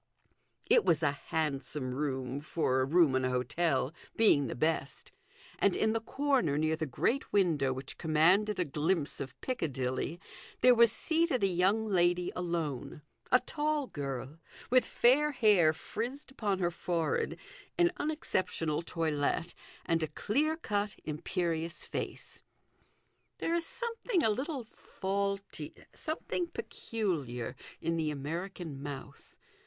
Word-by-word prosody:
It 480 -2 +5
was 160 0 +2
a 145 - +4
handsome 140 -3 -2
room 130 -1 -2
for 145 -3 0
a - - +2
room 155 -1 +4
in 130 - +1
a 130 - +1
hotel, 135 +3 0 0.2
being 145 -11 +4
the - - -4
best; 140 -1 -1 0.5
and 200 - +3
in 220 0 +2
the 225 - 0
corner 260 - +1
near 155 +1 +2
the 160 0 -3
great 235 - 0
window 165 -9 +3
which 130 +2 -6
commanded 180 +6 +3
a 180 - +2
glimpse 155 +2 -1
of 130 -1 -7
Piccadilly, 140 - -2 0.4
there 250 0 +8
was 235 -2 +6
seated 320 -3 +1
a - - +5
young 190 +5 +2
lady 175 -3 +2
alone 155 -6 -3 0.3
a 250 - +7
tall 300 -1 0
girl, 140 - -5 0.3
with 255 0 +5
fair 290 +5 +4
hair 205 - +5
frizzed 250 - -5
upon 205 -6 -1
her 175 -2 0
forehead, 170 -2 -1 0.4
an 345 0 +4
unexceptionable 185 - -1
toilette, 165 0 -1 0.3
and 165 -1 +1
a 155 - 0
clear 290 - 0
cut 205 - -1
imperious 165 +1 -2
face. - - -5 1.0
There 330 - -1
is 340 -1 0
something 465 -5 -1
a 220 - +4
little 265 +4 -3
faulty, 200 -6 -4 0.2
something 330 +2 -3
peculiar, 175 - -3 0.2
in 165 0 -1
the 155 -2 0
American 160 +1 -5
mouth. 140 -1 -8
170 Hz, 135 wpm, -32 LUFS, 145-225 Hz, 1.0 s, there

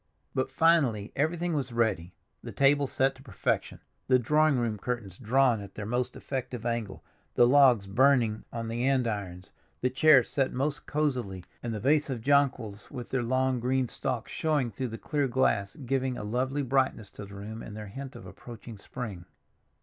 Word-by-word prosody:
But 130 - 0
finally 140 -11 +2
everything 165 +4 0
was 135 -4 -2
ready, 110 -7 0 0.3
the - - -7
table 140 0 +3
set 135 +1 +1
to 130 - -17
perfection, 115 -9 -2 0.3
the 130 - +5
drawing 150 +4 +3
room 115 -4 -1
curtains 110 -5 -4
drawn 125 -1 +3
at 100 -1 -11
their 105 - -5
most 125 +3 -1
effective 125 -3 -5
angle, 115 -5 -3 0.3
the 120 - +6
logs 125 -5 +5
burning 115 0 +3
on 115 -1 -4
the 115 +2 -2
andirons, 105 -9 -1 0.3
the 125 - +1
chairs 135 -2 +5
set 135 -2 0
most 135 +1 -2
cozily, 125 - -1 0.2
and 120 - -4
the 110 - -3
vase 150 +6 +2
of 125 -4 -3
jonquils 125 -6 +1
with 125 -4 -7
their 130 - 0
long, 130 +1 +1
green 130 +1 +1
stalks 120 0 -3
showing 150 -7 0
through 130 +6 -3
the 115 -1 -6
clear 145 +1 -1
glass, 110 -6 +1
giving 130 -1 -1
a - - -5
lovely 130 +6 -1
brightness 130 -5 0
to 105 - -9
the 100 0 -11
room 110 +3 -7
in 105 - -8
their 105 0 -6
hint 135 +4 -8
of 115 - -10
approaching 110 +3 -10
spring. 100 -7 -7
125 Hz, 180 wpm, -28 LUFS, 110-135 Hz, 0.3 s, the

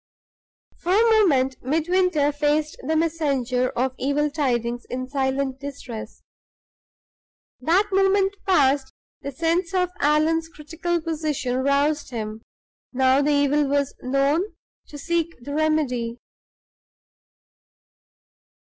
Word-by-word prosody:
For 355 +2 -1
a 455 +2 +4
moment, 275 -12 +3
Midwinter 320 +1 +1
faced 295 +1 0
the 320 - +1
messenger 275 -6 0
of 255 +1 -1
evil 285 +2 0
tidings 240 -5 -1
in 255 0 -5
silent 265 0 -1
distress. 260 -5 -8 1.4
That 350 +10 +2
moment 390 0 +2
past, 280 -6 +3 0.3
the 280 - -5
sense 335 +5 -1
of 360 -1 +1
Allan's 315 +3 +2
critical 325 +3 -3
position 305 -6 -2
roused 280 +3 +1
him, 220 -2 -5 0.5
now 260 +1 +3
the 290 - +1
evil 285 0 +2
was 280 0 0
known, 275 +7 +1 0.4
to 295 - -10
seek 335 +2 -1
the 285 +4 -7
remedy. 285 -7 0
290 Hz, 105 wpm, -23 LUFS, 265-325 Hz, 1.4 s, a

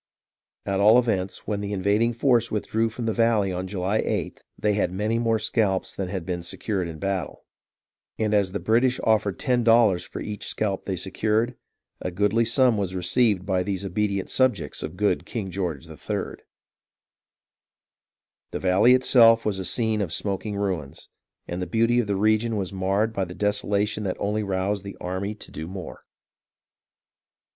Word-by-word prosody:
At 100 -1 -1
all 105 +4 +7
events, 100 -7 -1
when 105 -2 -2
the 100 0 -4
invading 100 +5 +1
force 120 -1 +2
withdrew 110 +1 0
from 115 +1 -6
the 110 - 0
valley 115 -4 +2
on 90 +1 -3
July 95 +2 -1
8th, - - -3 0.2
they 105 -1 +1
had 100 -3 0
many 105 +5 -1
more 115 -1 +2
scalps 105 -3 0
than 95 - -3
had 95 -3 -4
been 90 -1 -3
secured 90 +1 -3
in 80 - -7
the - - -12
battle; 95 -2 -3 0.7
and 110 -1 0
as 100 -3 +2
the 100 - -3
British 115 +7 +2
had - - -8
offered 110 -3 +2
ten 125 -4 +1
dollars 115 -6 +4
for - - -7
each 105 -1 -5
scalp 100 -3 -2
they 95 - -2
secured, 110 +6 0 0.5
a - - -2
goodly 105 +5 +2
sum 120 0 +3
was 95 -2 -2
received 95 +2 +1
by 95 -2 +1
these 95 +1 -3
obedient 100 +1 -1
sub 130 -3 +3
jects 85 - -6
of - - -6
good - - +1
King 100 -5 -5
George 85 -7 -3
III. - - -4 2.1
The - - -4
valley 95 +7 +5
itself 115 -3 +5
was 100 -3 -1
a 95 - -3
scene 110 -1 +1
of 90 -5 -2
smoking 100 +2 -3
ruins, 95 -9 -4 0.4
and 90 +1 -4
the 90 - -3
beauty 115 +1 +2
of 120 - 0
the 100 - 0
region 110 +2 +2
was 100 0 -3
marred 100 +4 0
by 95 -2 -1
the 90 0 -9
desolation 105 +1 0
that 95 - -2
only 105 +1 -1
roused 100 0 -1
the 100 - -8
army 95 +4 -3
to - - -8
do 80 +1 -6
more. 90 -2 -8
100 Hz, 180 wpm, -25 LUFS, 95-110 Hz, 2.1 s, all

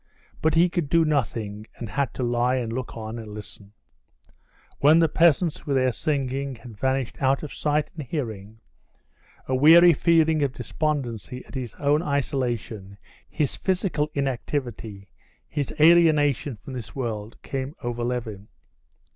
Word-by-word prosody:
But 160 +1 +2
he 170 +2 +5
could 170 -4 -2
do 165 0 +4
nothing, 110 -7 -2
and 115 - -6
had 140 +2 -1
to 130 - -3
lie 120 +1 +1
and 120 -3 -2
look 125 -1 -5
on 110 +1 -6
and 105 -2 -8
listen. 100 -1 -11 1.1
When 150 +3 +6
the 165 -1 +5
peasants, 165 0 +2
with 140 - +1
their 130 -1 +3
singing, 135 -1 -2
had 115 -1 -12
vanished 130 +2 -1
out 135 +1 +2
of 150 - -6
sight 150 0 0
and 160 - -5
hearing, 110 - -5 0.9
a 130 - -1
weary 165 +6 +8
feeling 160 0 +3
of 140 -3 0
despondency 130 -7 -3
at - - -15
his 125 -5 -5
own 145 +2 +2
isolation, 120 - -2 0.3
his 150 -4 -1
physical 180 -5 -1
inactivity, 120 -7 -3 0.4
his 145 -3 -3
alienation 150 -5 +4
from 130 +6 -11
this 125 -3 -7
world, 115 -4 -4
came 135 +2 -4
over 120 0 -3
Levin. 115 -5 -4
130 Hz, 145 wpm, -25 LUFS, 115-150 Hz, 1.1 s, weary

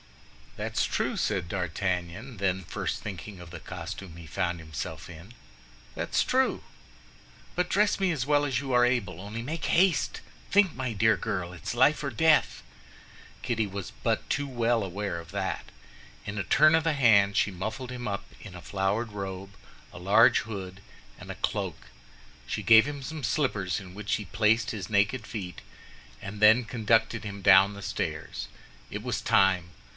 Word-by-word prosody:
"That's - - -1
true," - - -1
said 95 -4 -1
D'Artagnan, 95 - -3
then 95 -1 0
first - - -4
thinking 95 0 -7
of 85 -1 -11
the 90 - -7
costume 90 +1 -8
he 85 - -10
found 90 0 -2
himself 80 +1 -6
in, 85 +7 -12 0.6
"that's - - 0
true. 260 +1 +1 0.9
But 180 0 0
dress 205 +2 +2
me 190 -2 +3
as 140 -7 -1
well 145 0 +3
as 135 -5 0
you 135 -2 -3
are 125 0 +5
able, 100 -8 -1
only 110 +4 -6
make 155 +6 -4
haste; 175 -5 +2 0.3
think, 200 -4 +4
my 130 -2 -3
dear 110 +1 +3
girl, 90 -5 -3
it's 90 +6 -5
life 145 +5 +4
and 140 - -4
death!" 160 -1 +3 0.8
Kitty 115 -3 0
was 100 -1 -6
but - - 0
too 145 0 0
well 120 -3 +1
aware 100 -1 -3
of 85 0 -11
that. 95 -1 -3 0.6
In 105 - -5
a 105 - 0
turn 155 - +5
of 160 - +2
the 165 -1 +1
hand 105 -7 +4
she 100 - +2
muffled 110 +8 -5
him 125 -2 -5
up 100 -1 -3 0.2
in 95 -4 -10
a 90 - -9
flowered 100 +4 -1
robe, 95 -1 -6 0.4
a - - -9
large 110 +7 +5
hood, 95 -3 -7 0.4
and - - -11
a - - -5
cloak. - - -3 0.6
She - - -4
gave 110 +2 +7
him 145 -2 -5
some 155 +1 -6
slippers, 110 - 0
in 90 -2 -11
which 105 +1 -2
he 105 - -5
placed 110 +4 +2
his 105 -4 -6
naked 105 +3 +1
feet, 95 -5 -6 0.6
and 100 0 -7
then 110 +3 +6
conducted 115 0 +1
him 100 -1 -6
down 95 0 +6
the 100 - -9
stairs. 80 -4 -4 0.4
It - - -6
was - - -2
time. 95 -3 +3
105 Hz, 170 wpm, -28 LUFS, 95-125 Hz, 0.9 s, gave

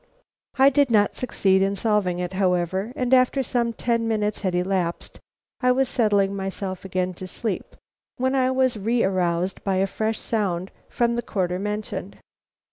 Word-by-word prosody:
I 270 +1 +6
did 280 0 +3
not 210 -3 +3
succeed 190 -6 +1
in 195 +1 +1
solving 200 -3 +1
it, 180 +1 -3
however, 185 +2 0
and 250 0 0
after 260 +1 +4
some 235 -1 0
ten 230 0 -1
minutes 210 -2 -1
had 185 -3 -1
elapsed, 180 -1 -2 0.4
I 250 -1 +3
was 265 +1 +2
settling 205 -4 +2
myself 190 -1 -4
again 185 -1 -2
to 185 +1 -8
sleep 205 +2 -4 0.4
when 260 +1 0
I 260 -1 +2
was 260 -2 +1
re 230 +4 +1
aroused 185 -1 0
by 195 -1 0
a 190 +1 +2
fresh 220 +2 -2
sound 190 -5 -2 0.2
from 235 0 0
the - - 0
quarter 180 -5 -2
mentioned. 210 +1 -4
205 Hz, 165 wpm, -24 LUFS, 185-235 Hz, 0.4 s, I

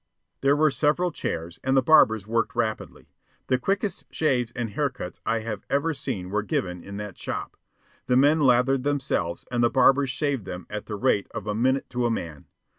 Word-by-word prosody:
There 140 +1 +4
were 155 0 +3
several 150 +7 +1
chairs, 85 - -4
and 135 0 +2
the 130 - +4
barbers 110 -8 +5
worked 115 +2 -1
rapidly. 110 -2 -3 0.4
The 130 - +2
quickest 200 - -1
shaves 125 -6 0
and 120 -4 -3
hair 145 +7 0
cuts 125 -8 -8
I 115 -1 +1
have 110 -3 -5
ever 145 +4 +1
seen 100 -10 -4
were 105 +1 +1
given 90 -3 -3
in 100 0 -8
that 105 -3 -7
shop. - - -4 0.5
The 125 0 +3
men 145 +4 +5
lathered 130 -1 +3
themselves, 130 -12 -1
and 120 -1 +1
the 120 - +4
barbers 135 +1 +4
shaved 135 -4 -1
them 90 -2 -7
at 105 0 -5
the 105 - -4
rate 100 0 +1
of 105 - -4
a 105 - -1
minute 130 +5 +1
to 125 -1 0
a - - 0
man. 80 -10 -5
125 Hz, 195 wpm, -25 LUFS, 105-140 Hz, 0.5 s, barbers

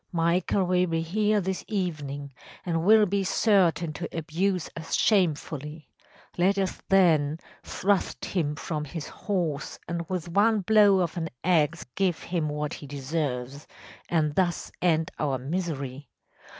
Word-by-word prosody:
Michael 170 +3 +1
will 180 0 +2
be 165 -1 0
here 210 +5 +1
this 190 -1 -3
evening, 145 -8 -3 0.3
and 165 -2 0
will 215 +3 +6
be 200 0 0
certain 180 -5 +2
to 170 +2 -5
abuse 170 +3 -1
us 165 -1 -3
shamefully. 155 - 0 0.5
Let 195 +3 +3
us, 190 -1 -1
then, 160 -6 +4 0.2
thrust 200 0 -1
him 155 -5 -1
from 150 0 -4
his 150 +1 -6
horse 170 -8 -3
and 170 -1 -4
with 180 -3 -3
one 210 +5 +3
blow 205 -1 +5
of 175 0 -2
an 165 -1 -2
axe 170 -2 +2
give 185 -4 +1
him 165 -4 -1
what 150 0 -3
he 145 - -8
deserves, 140 -1 -3 0.4
and 155 -3 +1
thus 175 0 0
end 160 -2 +2
our 140 -3 0
misery. 140 -2 -4
170 Hz, 140 wpm, -27 LUFS, 150-190 Hz, 0.5 s, will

